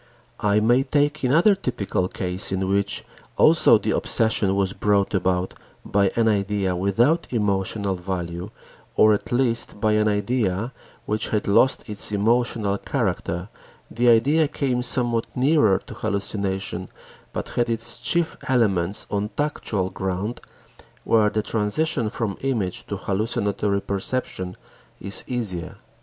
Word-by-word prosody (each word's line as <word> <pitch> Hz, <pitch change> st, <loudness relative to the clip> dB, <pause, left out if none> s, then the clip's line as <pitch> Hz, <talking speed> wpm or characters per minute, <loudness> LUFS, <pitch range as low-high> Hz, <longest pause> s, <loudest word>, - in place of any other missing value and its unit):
I 105 Hz, 0 st, +2 dB
may 120 Hz, +4 st, +4 dB
take 145 Hz, +2 st, 0 dB
another 165 Hz, +11 st, +5 dB
typical 110 Hz, -, -2 dB
case 90 Hz, 0 st, -1 dB
in 95 Hz, 0 st, -1 dB
which 100 Hz, +1 st, 0 dB, 0.3 s
also -, -, +6 dB
the -, -, -2 dB
obsession 110 Hz, -3 st, +1 dB
was 100 Hz, -1 st, 0 dB
brought 100 Hz, -1 st, +1 dB
about 95 Hz, -1 st, 0 dB, 0.3 s
by 100 Hz, -1 st, +2 dB
an 115 Hz, -1 st, +2 dB
idea 100 Hz, -3 st, 0 dB
without 115 Hz, -, +2 dB
emotional 100 Hz, -2 st, -1 dB
value 90 Hz, -1 st, -4 dB, 0.5 s
or 110 Hz, 0 st, +6 dB
at 105 Hz, -, -3 dB
least 120 Hz, -4 st, 0 dB
by 110 Hz, 0 st, +2 dB
an 105 Hz, 0 st, +2 dB
idea 105 Hz, +1 st, 0 dB, 0.3 s
which 105 Hz, +1 st, -1 dB
had 105 Hz, -1 st, -1 dB
lost 115 Hz, +6 st, +3 dB
its 105 Hz, -1 st, 0 dB
emotional 105 Hz, -1 st, +1 dB
character; 95 Hz, -6 st, -2 dB, 0.4 s
the 120 Hz, +2 st, +2 dB
idea 145 Hz, +7 st, +4 dB
came 130 Hz, -4 st, -1 dB
somewhat 120 Hz, -2 st, 0 dB
nearer 130 Hz, -7 st, +4 dB
to -, -, -9 dB
hallucination, 100 Hz, -3 st, -3 dB, 0.4 s
but -, -, -5 dB
had 120 Hz, -1 st, 0 dB
its 115 Hz, +1 st, -2 dB
chief 170 Hz, +7 st, 0 dB
elements 100 Hz, -7 st, +2 dB
on 105 Hz, +1 st, -1 dB
tactual 110 Hz, -10 st, -1 dB
ground 95 Hz, +4 st, -3 dB, 0.6 s
where 110 Hz, -2 st, +3 dB
the 110 Hz, +1 st, -1 dB
transition 115 Hz, +4 st, 0 dB
from 105 Hz, -3 st, -3 dB
image 115 Hz, -10 st, -2 dB
to 100 Hz, -, -4 dB
hallucinatory 100 Hz, 0 st, -1 dB
perception 100 Hz, -3 st, -2 dB, 0.4 s
is 100 Hz, -, -2 dB
easier. 105 Hz, -9 st, -3 dB
105 Hz, 130 wpm, -23 LUFS, 95-120 Hz, 0.6 s, also